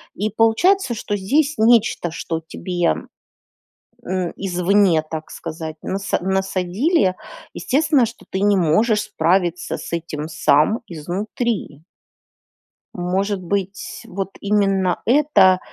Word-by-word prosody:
И, 210 +3 -1
получается, 235 - +2
что 210 -1 -3
здесь 285 +10 +1
нечто, 220 -6 +3
что 165 0 -4
тебе, 175 +1 -1 1.1
э, 185 -2 -2
извне, 185 -2 +2
так 160 -1 -6
сказать, 160 -1 -6
наса 195 0 -2
насадили. 190 - +1 0.4
Естественно, 285 -2 +2
что 230 +1 -10
ты 190 - -2
не 205 0 +3
можешь 210 +6 +2
справиться 175 0 0
с - - -8
этим 155 -2 -4
сам, 155 - +2
изнутри. 185 - -3 1.1
Может 190 +2 -1
быть, 195 +1 -4
вот, 195 +1 -4
именно 195 -3 +1
это 245 -9 +4
190 Hz, 105 wpm, -20 LUFS, 175-220 Hz, 1.1 s, это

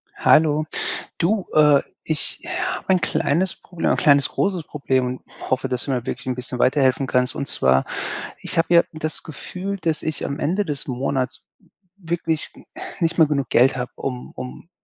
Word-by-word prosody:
Hallo. 155 -1 +4 0.5
Du, 195 +3 +1
äh, 150 -2 +6 0.2
ich 155 -2 -2
habe - - -3
ein 185 - +4
kleines 170 +5 +1
Problem 175 -2 -3
ein - - +3
kleines 140 -2 +4
großes 185 -5 0
Problem, 130 -4 0
und 125 +1 -8
hoffe, 130 +1 +1
dass 125 -2 -2
du - - -4
mir 125 -2 -1
wirklich - - -5
'n 130 - 0
bisschen 125 0 -4
weiterhelfen 130 0 +3
kannst. 125 0 +1
Und 140 - -2
zwar, 65 0 +3 0.6
ich - - -4
habe 165 +1 +3
ja 170 - +8
das 155 0 -3
Gefühl, 185 +6 -5
dass 160 -3 -1
ich 155 -2 -2
am 140 - -3
Ende 190 +7 +1
des 150 -2 -4
Monats 130 0 -2 0.5
wirklich 165 -3 -2
n - - -15 0.4
nicht 165 0 +1
mehr 160 - +7
genug 140 -4 -1
Geld 130 +2 +5
habe, 125 0 -3
um 125 -2 -5
um 130 +6 -8
145 Hz, 180 wpm, -22 LUFS, 130-165 Hz, 0.6 s, ja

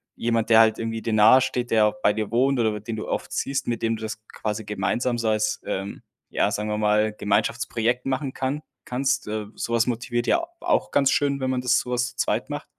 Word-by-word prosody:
jemand, 115 -1 0
der 110 -1 +7
halt 110 -1 +4
irgendwie 115 0 -3
dir 115 - -1
nahe 110 +5 +7
steht, 125 -1 -2
der 105 -1 +4
bei 105 - +3
dir 105 -1 -3
wohnt 130 +3 +2
oder 110 -2 +1
den 110 +2 -5
du 110 - -5
oft - - -3
siehst, 135 0 -2
mit 120 -2 -2
dem 115 0 +1
du - - -12
das 110 0 -6
quasi 110 0 -4
gemeinsam 110 +5 -1
so 115 -1 0
als, 105 -1 0
ähm, 95 +1 -4 0.3
ja, - - +1
sagen 105 +1 -2
wir 105 - -1
mal, 105 0 +2
Gemeinschaftsprojekt 115 +3 0
machen 135 0 -2
kann 135 +3 -2 0.2
kannst? 130 0 -1
Äh, 105 0 -3
sowas 115 0 0
motiviert 120 0 -2
ja - - +4
a 335 - -7
auch 340 -2 +1
ganz 140 -2 +3
schön, 140 -1 +1
wenn 130 -1 -1
man 130 -1 -1
das 125 -1 +3
sowas 125 0 -1
zu 120 - -18
zweit 115 0 -1
macht. 145 0 -5
115 Hz, 225 wpm, -24 LUFS, 110-125 Hz, 0.3 s, der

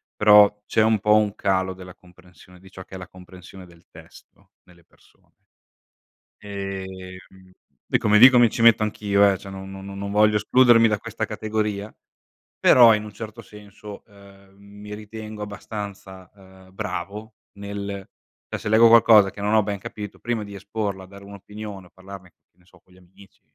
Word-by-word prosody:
però 105 -1 +5
c'è 110 - 0
un 110 -1 +2
po' 105 +2 +3
un 105 -1 +1
calo 95 -1 -1
della 90 -1 -13
comprensione, 90 0 -20
di 95 - -17
ciò 95 0 -12
che 95 - -13
è - - -6
la 90 - -10
comprensione 90 +1 -15
del 85 -1 -21
testo, - - -19
nelle 85 -1 -23
persone. - - -30 1.1
Ehm, 95 -2 -9 0.4
e - - +1
come 105 0 +3
dico 125 +2 +8
mi 120 -2 +4
ci 115 - -4
metto 115 -1 +5
anch'io, 100 -1 +1
eh, 95 - -5
cioè 100 0 -12
non 95 0 -9
no 95 - -10
no 100 0 -10
non 100 0 -6
voglio 105 +1 +3
escludermi 120 0 +4
da 105 -1 -1
questa - - -5
categoria, 105 -1 -4 0.7
però 120 -3 +6
in 105 0 -2
un 105 - -11
certo 110 +1 -9
senso, 105 -1 -13
ehm, 100 -1 -20
mi 105 +1 -12
ritengo 110 0 -9
abbastanza, 100 -3 -9
ehm, 95 -1 -19
bravo 105 +2 -7 0.2
nel 100 -1 -7 0.4
cioè - - -4
se - - -7
leggo 110 +2 +6
qualcosa, 110 -3 +6
che 100 - -11
non 105 +1 -1
ho 110 - +4
ben 100 0 -4
capito, 105 +1 -9
prima 120 -2 -3
di 100 -1 -11
esporla, 100 -1 -5
dare 100 +1 -15
un'opinione 100 0 -10
o - - -24
parlarne 95 -1 -13
che 85 - -48
ne 90 - -29
so - - -23
con 90 - -27
gli 90 - -21
amici, 95 +2 -21
100 Hz, 180 wpm, -22 LUFS, 95-105 Hz, 1.1 s, dico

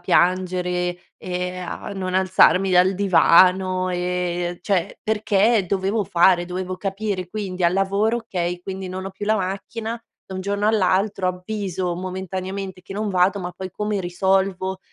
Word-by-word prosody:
piangere, 180 0 +1 0.2
ehm, 180 0 -4
a - - -6
non 185 -2 -4
alzarmi 190 0 +4
dal 185 +1 +4
divano, 185 -1 +4
ehm 180 -1 -2
cioè, 185 -3 -1
perché 215 0 +2
dovevo 195 +3 0
fare, 175 +1 +4
dovevo 185 +1 -4
capire. 195 -1 -3
Quindi, 185 -3 -3
al 170 - +4
lavoro: 200 +4 +1
"Okay, 180 -5 -3
quindi, 190 0 -6
non 185 +1 -5
ho - - -5
più 200 +2 -7
la 215 +1 +3
macchina 220 +4 -4 0.2
da 190 - -9
un 185 - -3
giorno 200 +2 -1
all'altro, 195 -1 +1
avviso 185 -1 -3
momentaneamente 185 +1 -5
che 185 - -10
non 210 +1 -2
vado, 190 +1 +2
ma 180 -1 -4
poi 185 +1 -7
come 210 +2 -2
risolvo?" 190 +1 0
185 Hz, 150 wpm, -22 LUFS, 180-195 Hz, 0.2 s, alzarmi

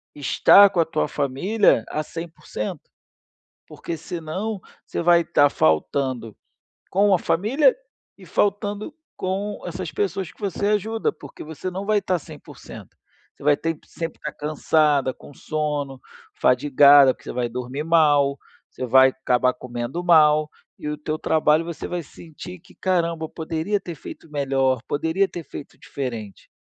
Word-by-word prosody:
estar 200 +7 +6
com 185 - -2
a 165 - +4
tua 155 - -1
família 145 - +1
a 155 - -2
100%. 160 -9 -6 0.9
Porque 165 - -6
senão, 180 +6 -4 0.3
você - - -3
vai 170 0 +5
estar 145 -4 +3
faltando 115 - 0 0.6
com 200 +1 +3
a 180 - +3
família 235 - +2 0.4
e - - -14
faltando 205 +6 -1 0.2
com 195 +3 -3
essas 175 -1 -5
pessoas 195 -3 -2
que - - -26
você 200 0 -2
ajuda, 220 +2 0
porque 145 -4 -12
você 160 +4 -6
não 190 +2 -5
vai 215 -1 +3
estar 185 -3 -1
100%. - - -12 0.4
Você - - -17
vai 145 -1 +4
ter 165 -1 -3
sempre 165 -1 -6
que - - -4
estar - - -11
cansada, 150 -2 +1
com - - -15
sono, 145 -3 -3 0.3
fadigada, 140 +1 +5
porque - - -23
você - - -4
vai 120 -1 -1
dormir 125 +4 -5
mal, 145 -4 +3 0.3
você 130 - -6
vai 130 +2 +6
acabar 125 0 +1
comendo 120 +6 -5
mal, 155 -3 +5 0.3
e 150 - -5
o 150 - -3
teu 155 +1 -4
trabalho 155 0 +2
você 170 -1 -6
vai 175 -1 -3
sentir 170 +4 -11
que 185 - -20
"caramba, 170 -3 -1
poderia 165 +6 -2
ter 175 -3 -7
feito 155 +2 -11
melhor, 135 -3 0
poderia 165 +6 0
ter 175 - -7
feito 145 - -10
diferente". 115 -7 -7
155 Hz, 150 wpm, -23 LUFS, 140-180 Hz, 0.9 s, estar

